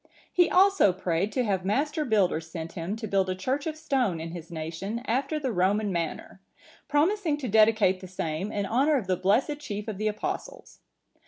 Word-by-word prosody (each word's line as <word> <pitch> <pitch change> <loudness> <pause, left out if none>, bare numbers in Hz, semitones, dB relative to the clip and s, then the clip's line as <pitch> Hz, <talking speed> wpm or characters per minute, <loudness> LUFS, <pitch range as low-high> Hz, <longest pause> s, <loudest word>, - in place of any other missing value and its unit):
He 355 -1 +4
also 385 - +5
prayed 185 +2 -1
to 255 - +1
have 195 -5 0
master 295 - 0
builders 185 - +1
sent 165 -1 -6
him 175 +3 -4
to 225 0 -6
build 195 -2 +1
a 185 - -1
church 265 - -2
of 310 -1 -4
stone 260 - 0
in 165 +1 -6
his 170 -1 -8
nation 170 +8 -5
after 270 +6 0
the 265 -4 -2
Roman 200 +2 +1
manner,(950) 170 +2 -7
promising 315 +2 +1
to 275 -4 -4
dedicate 215 -3 +4
the 185 - -9
same 180 +2 -3
in 205 -2 -2
honour 275 +8 +2
of 235 - -3
the 185 0 +1
blessed 230 - +1
chief 210 -7 -5
of 210 -3 -5
the 215 - 0
Apostles. 215 - -5
210 Hz, 190 wpm, -27 LUFS, 185-275 Hz, -, also